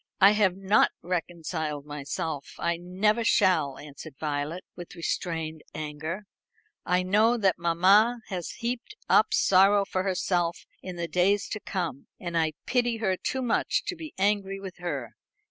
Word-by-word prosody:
"I 195 +1 +8
have 205 -4 +3
not 195 +2 +4
reconciled 165 -4 -3
myself; 150 +1 -5
I 170 0 0
never 195 +6 +1
shall," 155 -11 +3
answered 145 +1 -10
Violet, 150 +3 -3
with 175 0 -9
restrained 165 -2 -3
anger. 155 +6 -5 0.6
"I 180 0 +2
know 215 +6 +3
that 195 -4 +2
mamma 195 +8 +4
has 180 -4 -4
heaped 245 - -4
up - - +5
sorrow 195 +1 +5
for 185 -1 -1
herself 180 -2 0 0.2
in 185 -1 -7
the 170 -1 -3
days 195 +4 +2
to 215 - -3
come, 175 -10 -4
and 175 -1 -5
I 160 -1 +2
pity 240 -2 +1
her 195 -4 0
too 260 +7 -3
much 245 - +1
to 385 - -3
be 320 -2 -9
angry 195 0 +1
with 190 -2 -8
her. 145 -10 -4
180 Hz, 150 wpm, -27 LUFS, 165-205 Hz, 0.6 s, I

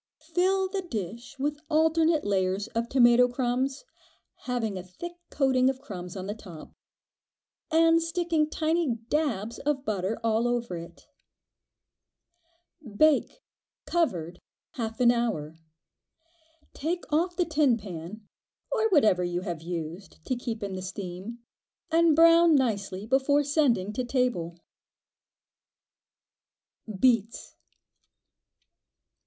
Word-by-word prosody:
Fill 380 +1 +2
the 385 +1 -3
dish 230 - -6
with 290 +2 -2
alternate 320 0 +3
layers 190 0 0
of 230 +1 -3
tomato 245 -1 +5
crumbs, 255 - -2 0.6
having 235 -5 -2
a 185 - -4
thick 185 - -8 0.2
coating 260 -2 +2
of 265 -1 -3
crumbs 185 -8 -8
on 185 - -5
the 205 - -3
top, 180 -8 -12 1.0
and 330 +1 +4
sticking 330 -2 0
tiny 315 -5 0
"dabs" 235 -8 -1
of 275 -2 -2
butter 205 0 -1
all 225 +1 +1
over 240 -5 -2
it. 170 0 -10 1.9
Bake, 310 - +3 0.4
covered, 180 - -1 0.3
half 225 -6 -5
an 240 -1 +6
hour. 165 -11 -2 1.1
Take 345 +4 -3
off 350 +3 +1
the 355 - +1
tin 300 -6 +2
pan, 195 +1 -9 0.4
or 445 -3 +1
whatever 220 - +4
you 175 0 -2
have 170 -3 -5
used 170 +1 -7
to 255 - -1
keep 235 -3 -5
in 200 -1 -4
the 185 - -5
steam, 190 +4 -7 0.5
and 330 -1 +4
brown 335 0 +6
nicely 200 -7 -1
before 270 +4 +2
sending 265 - +1
to 255 - -2
table. 240 -10 -1 2.4
Beets. 230 -2 +1
240 Hz, 115 wpm, -27 LUFS, 195-305 Hz, 2.4 s, an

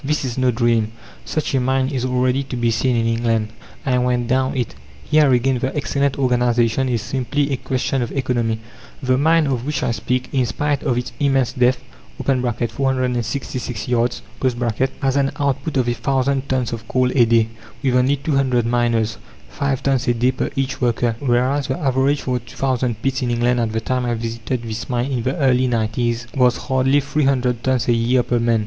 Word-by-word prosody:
This 150 0 -1
is 120 -2 -3
no 130 -1 +2
dream, 115 -2 +1 0.3
such 155 -3 -2
a 135 - +3
mine 130 +1 +1
is 130 -3 -2
already 125 +1 +1
to 130 - -5
be 120 -1 +1
seen 125 +2 +1
in 115 -1 +1
England; 115 -1 0 0.4
I 125 -2 +2
went 125 -1 0
down 130 +2 +1
it. 125 -3 -2 0.3
Here 150 - +4
again 125 +1 +2
the 130 +2 -2
excellent 140 -1 0
organization 125 -1 +2
is 115 -4 -1
simply 140 +2 -1
a - - 0
question 130 +1 -1
of 120 - -3
economy. 120 -4 0 0.5
The 130 0 +2
mine 160 +2 +4
of 130 -4 -1
which 145 0 -2
I - - +1
speak, 125 +2 -2
in 130 -3 +2
spite 145 +2 -1
of 120 - 0
its 125 - -3
immense 135 -3 +2
depth 125 0 +2 0.4
(466 125 -1 -1
yards), 120 0 0 0.8
has 135 0 +2
an 140 -1 +1
output 140 +1 -1
of 125 -2 +1
a 120 - +2
thousand 135 +3 0
tons 130 -3 0
of 110 -1 -6
coal 130 0 +1
a 125 - +5
day, 115 -1 +3 0.3
with 130 -2 +2
only 130 +3 +3
two 145 +1 -2
hundred 125 -4 +2
miners 115 -2 +1 0.3
five 135 - -2
tons 135 -1 +1
a 120 - +3
day 125 +2 +2
per 130 - -2
each 135 0 -2
worker, 120 -1 +1
whereas 130 +2 +1
the 130 - -1
average 135 +1 +1
for 125 -1 -1
the 120 - -20
two 115 - -13
thousand 125 -4 0
pits 135 -1 0
in 125 - -1
England 120 +1 +1
at 115 -2 0
the 110 - -1
time 125 +1 -1
I 120 - 0
visited 115 +2 -4
this 115 0 -5
mine 125 +2 -1
in 125 -3 -1
the 130 +4 -1
early 130 -3 +3
'nineties, 120 0 -1
was 125 -2 +3
hardly 135 +1 +2
three 145 +1 0
hundred 125 -3 +1
tons 130 -2 +1
a 120 - +4
year 120 +2 +2
per 120 0 0
man. 115 -1 +2
125 Hz, 200 wpm, -20 LUFS, 120-135 Hz, 0.8 s, a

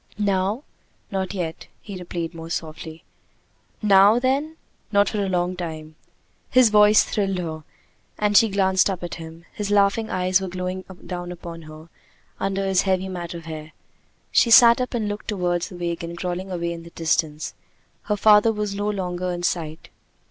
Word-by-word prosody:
"Now?" 200 +4 0 0.5
"Not 190 0 -2
yet," 165 -3 -4
he 200 - -9
repeated 175 -2 -5
more 165 0 -8
softly. 160 0 -6 0.8
"Now, 200 +2 +6
then?" 275 +5 0 0.4
"Not 200 -1 +4
for 210 -2 -1
a 195 - -2
long 180 0 0
time." 160 -3 -6 0.6
His 250 -3 +5
voice 210 0 +6
thrilled 195 -3 -1
her, 160 -3 -5 0.5
and 210 0 +1
she 225 +2 +6
glanced 190 -1 +2
up 185 -2 -4
at 175 - -5
him. 165 +1 -11
His 205 -1 -4
laughing 205 +2 +2
eyes 185 +1 +1
were 190 - -3
glowing 185 +1 -4 0.2
down 175 -1 -5
upon 170 -1 -8
her 155 +2 -12 0.5
under 195 0 -1
his 190 -1 +3
heavy 190 -1 0
mat 175 -2 -6
of 165 -1 -8
hair. 155 -1 -8 0.6
She 235 - +4
sat 235 +1 +8
up 250 0 -3
and 220 -3 -1
looked 205 0 -5
toward 180 -4 0
the 180 - -6
wagon 170 -1 -4
crawling 180 +2 -4
away 170 -1 -2
in 170 - -8
the 170 - -12
distance; 160 -2 -1 0.5
her 210 -1 0
father 210 +2 +6
was 210 -2 -3
no 205 +1 -2
longer 180 -3 -2
in 175 0 -4
sight. 160 -3 -3
185 Hz, 170 wpm, -23 LUFS, 170-205 Hz, 0.8 s, sat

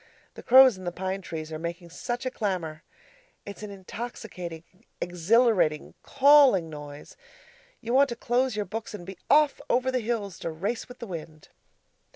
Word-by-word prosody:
The - - -10
crows 260 -5 +7
in - - -10
the 175 - -3
pine 190 +2 -4
trees 160 -3 -7
are 155 - -5
making 170 +1 -6
such 240 +8 -4
a 255 - -1
clamour! 175 -9 -3 0.6
It's 200 0 -9
an 210 - -6
intoxicating, 190 -4 -7 0.4
exhilarating, 180 -2 +2
CALLING 275 - +5
noise. 145 -1 -10 0.7
You 235 +1 -3
want 275 +1 +5
to 235 - -4
close 245 +1 0
your 210 -1 -2
books 220 +3 -6
and 175 - -9
be 190 -1 -9
off 295 -1 +4
over 255 +1 +2
the 255 - 0
hills 215 -5 -3
to - - -4
race 200 +11 -4
with 245 - -11
the 235 - -7
wind. 160 -5 -9
200 Hz, 170 wpm, -27 LUFS, 170-240 Hz, 0.7 s, crows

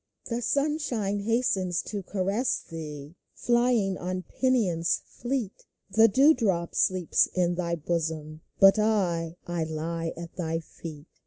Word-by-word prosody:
The 235 0 -3
sunshine 260 -8 0
hastes 200 -5 0
to 205 -2 -3
caress 200 +6 -1
thee 150 -2 -7 0.2
Flying 240 -5 +2
on 185 +1 -3
pinions 190 -8 +1
fleet; 240 -5 -4 0.2
The 225 +4 +6
dew 275 +9 +6
drop 190 - 0
sleeps 185 -3 +2
in 175 -1 +2
thy 170 -1 -1
bosom, 160 -1 -3 0.2
But 195 +2 +7
I— 175 -6 +1
I 175 -1 -2
lie 165 +1 -3
at 170 0 -8
thy 165 -2 -1
feet 155 -2 -10
185 Hz, 130 wpm, -27 LUFS, 165-225 Hz, 0.2 s, But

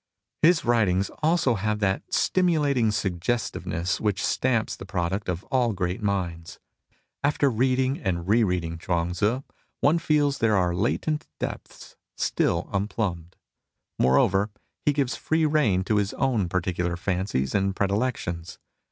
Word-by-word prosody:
His 165 0 +4
writings 100 -5 +2
also 155 -5 +3
have 105 0 -1
that 95 -2 0
stimulating 150 -10 +2
suggesti^eness 100 -2 -2
which 105 -3 0
stamps 125 -4 0
the - - -10
product 95 +1 -2
of 90 +1 -2
all 125 -4 +2
great 90 +2 -2
minds. 90 -5 -2 0.7
After 145 -1 +2
reading 130 +3 +1
and 90 -3 -2
re 115 +4 +4
reading 85 -4 -1
Chuang 85 -1 -1
Tzu, 105 +9 0 0.4
one 160 +4 +3
feels 150 -3 +1
there 110 -3 +3
are 90 -2 +1
latent 150 - -1
depths - - -7 0.2
still 85 +2 0
unplumbed. 95 -4 -2 0.6
Moreover, 95 - +3 0.4
he - - +6
gives 140 -3 0
free 160 0 +1
rein 140 -12 +2
to 105 +2 +1
his 100 -1 0
own 115 -10 +1
particular 90 -1 -1
fancies 90 -8 -1
and 95 -1 +1
pre 100 - +1
dilections. 95 -6 -2
100 Hz, 135 wpm, -25 LUFS, 90-130 Hz, 0.7 s, he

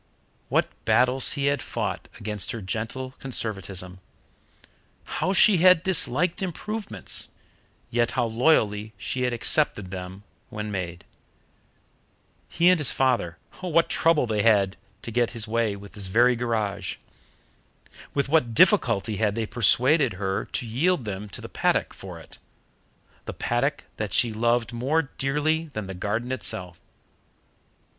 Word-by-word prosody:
What - - +2 0.2
battles 125 +1 +3
he 140 -1 -2
had 140 0 +1
fought - - -4
against 105 -2 0
her 115 - -5
gentle 115 +7 -4
conservatism! 95 -7 -4 1.0
How 185 - -2
she 195 0 +5
had 180 0 +6
disliked 180 - +1
improvements, 210 +4 -2 0.6
yet 120 0 +2
how - - +2
loyally 110 -4 +1
she 125 +6 -4
had 125 0 +1
accepted 115 -5 0
them 95 +1 -7 0.3
when 105 0 -5
made! 90 -3 -5 1.4
He 170 +1 +2
and 180 - +3
his 150 - +2
father 120 -10 0 0.2
what 170 -2 +1
trouble 165 -5 +3
they 110 -3 0
had 115 +1 +6 0.2
had - - -19 0.3
to 115 - -6
get 120 +1 +1
this 115 -2 -3 0.6
very 120 +6 +4
garage! 110 -4 -2 1.2
With 140 -1 +1
what 135 -6 +2
difficulty 115 - +3
had 105 -1 +1
they 115 -1 -1
persuaded 125 - +3
her 95 0 -2
to 125 - -4
yield 135 +5 0
them 105 0 -5
to - - -7
the - - -7
paddock - - 0
for - - -9
it - - -14 0.9
the - - -5
paddock 135 +4 -1
that 105 -3 -3
she 115 -2 +3
loved 120 +1 +1
more 135 +5 0
dearly 155 +4 0
than 110 -2 -4
the 95 - -6
garden 110 +7 -3
itself! 90 -9 -2
120 Hz, 135 wpm, -25 LUFS, 105-145 Hz, 1.4 s, had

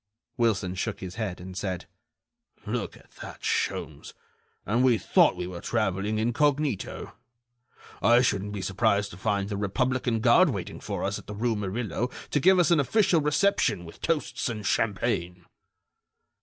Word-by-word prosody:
Wilson 105 -6 +1
shook 95 - -3
his 90 -1 -7
head, 105 -5 -4
and 90 +1 -9
said: 95 -2 -3 0.8
"Look - - -3
at - - -22
that, - - -9
Sholmes, 455 0 -2 0.5
and 125 - +1
we 125 -3 +4
thought - - +3
we 90 - -4
were 90 -1 -7
traveling 100 +3 -1
incognito! 135 +2 0 0.9
I 120 +4 +5
shouldn't 105 -4 0
be 100 -2 -4
surprised 100 +1 +1
to 90 - -10
find 100 +1 -1
the 100 -1 -3
republican 120 +3 0
guard 130 +10 +5
waiting 100 -9 -5
for - - -4
us - - -1
at - - -16
the 105 - -6
rue 115 +2 0
Murillo 110 +4 -2 0.2
to 145 - +2
give 190 +6 +5
us 175 -2 +3
an 170 - +5
official 175 - +3
reception 150 - +1
with 80 - -13
toasts 155 -5 -1
and 110 -3 -5
champagne." 95 -6 -1
110 Hz, 155 wpm, -27 LUFS, 95-130 Hz, 0.9 s, I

